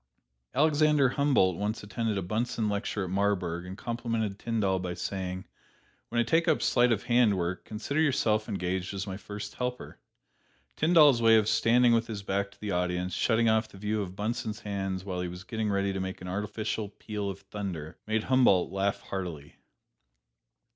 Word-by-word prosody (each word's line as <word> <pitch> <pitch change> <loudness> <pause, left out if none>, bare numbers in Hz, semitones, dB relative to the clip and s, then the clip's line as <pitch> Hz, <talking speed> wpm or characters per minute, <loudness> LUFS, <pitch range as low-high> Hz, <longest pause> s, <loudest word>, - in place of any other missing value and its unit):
Alexander 150 -1 +4
Humboldt 130 - +2
once 105 +2 -2
attended 110 0 -2
a 95 - -2
Bunsen 110 +3 -1
lecture 100 0 -2
at 90 - -5
Marburg 95 -3 0
and 95 +1 -7
complimented 115 -4 -2
Tyndall 105 -5 0
by 90 -1 -4
saying, 95 0 -4 0.6
"When 120 - 0
I - - +4
take 165 +8 +2
up 155 - +2
sleight 120 -1 +4
of 110 -3 +1
hand 120 -4 +3
work, 90 +1 -3
consider 130 +8 -2
yourself 110 -7 +1
engaged 95 -1 -2
as 100 0 -3
my 95 -2 -5
first 105 +1 -7
helper." 125 0 -5 0.8
Tyndall's 150 -6 +5
way 115 -1 +6
of 105 -1 +2
standing 115 +2 +4
with 115 0 +2
his 105 -3 -5
back 100 +1 -1
to - - -22
the 105 -1 -4
audience, 90 0 -1
shutting 115 +5 +2
off 110 0 +3
the - - -14
view 105 +2 -1
of 95 -2 -6
Bunsen's 110 +1 -3
hands 95 -2 -3
while 90 -2 -3
he 90 - -2
was 90 +1 -8
getting 110 0 -2
ready 100 -1 0
to 95 - -3
make 95 0 -4
an 90 - -8
artificial 105 +2 -3
peal 105 0 -5
of 100 0 -7
thunder, 95 -6 -6
made 110 0 0
Humboldt 125 -9 +4
laugh 100 +1 -1
heartily. 85 -7 -6
105 Hz, 180 wpm, -29 LUFS, 95-115 Hz, 0.8 s, way